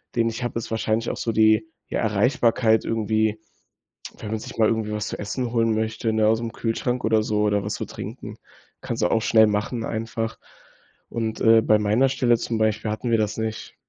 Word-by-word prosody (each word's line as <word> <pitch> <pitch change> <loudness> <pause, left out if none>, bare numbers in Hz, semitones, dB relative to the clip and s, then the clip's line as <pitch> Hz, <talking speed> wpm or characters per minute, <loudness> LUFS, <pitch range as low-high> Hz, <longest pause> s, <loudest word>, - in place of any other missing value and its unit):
den 115 -1 +2
ich 115 +2 -5
habe, 120 -1 -2
ist - - -7
wahrscheinlich 110 0 0
auch - - -4
so 115 - -1
die 110 +4 +4 0.2
die - - -4
Erreichbarkeit 110 +1 +2
irgendwie, 110 -1 0 0.8
wenn 110 - -7
man 110 - -1
sich - - -9
mal 110 -2 +4
irgendwie 110 -1 -1
was 105 0 -3
zu - - -5
essen 120 +4 -3
holen 115 -2 +2
möchte, 110 +1 -1
ne, 110 -1 +3
aus'm 115 +1 0
Kühlschrank 120 +2 -2
oder 110 -1 +3
so 105 -1 0
oder 105 -1 +1
was 105 - -3
zu - - -4
trinken. - - -8 0.4
Kannst - - -4
du - - +3
auch 115 - +2
schnell 110 -1 +5
machen, 110 +3 -2
einfach, 115 0 -3 0.7
und, 110 -1 -3
äh, 115 0 +6
bei 110 -1 +4
meiner 105 +6 +3
Stelle 125 -3 +2
zum 115 - -3
Beispiel 110 0 0
hatten 115 +3 -3
wir 115 - +3
das 105 0 -1
nicht. 110 0 -4
110 Hz, 205 wpm, -23 LUFS, 110-115 Hz, 0.8 s, äh